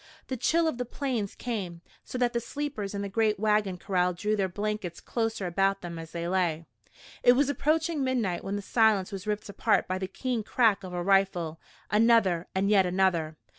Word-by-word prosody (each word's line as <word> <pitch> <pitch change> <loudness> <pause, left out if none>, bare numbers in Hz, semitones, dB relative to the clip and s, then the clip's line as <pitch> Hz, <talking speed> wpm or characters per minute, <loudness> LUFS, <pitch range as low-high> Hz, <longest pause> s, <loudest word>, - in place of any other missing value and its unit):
The 260 - -1
chill 330 +7 +2
of 255 -6 -2
the - - 0
Plains 245 -5 -3
came, 190 -9 -4 0.2
so - - -6
that 245 -1 +1
the 235 - +1
sleepers 235 -5 -4
in 200 - -2
the - - -3
great 215 0 +1
wagon 210 -3 +1
corral 180 -1 0
drew 210 +5 -1
their 195 -2 0
blankets 205 -2 -3
closer 225 -4 -2
about 195 +2 +1
them 170 -2 -6
as 165 0 -8
they 170 0 -4
lay. 175 -3 0 0.6
It 245 - +7
was 275 +2 +2
approaching 310 +1 +1
midnight 235 -9 -1
when 195 - -3
the 205 - -4
silence 220 -3 +2
was 195 +1 -7
ripped 210 0 -2
apart 200 - +1
by 185 0 -2
the 190 - -3
keen 245 +4 -2
crack 220 -2 +2
of 185 - -7
a 175 - -2
rifle 180 -4 +1 0.3
another 210 -6 +3
and 190 +1 +1
yet 195 -3 +5
another. 175 -4 +1
200 Hz, 200 wpm, -28 LUFS, 185-230 Hz, 0.6 s, It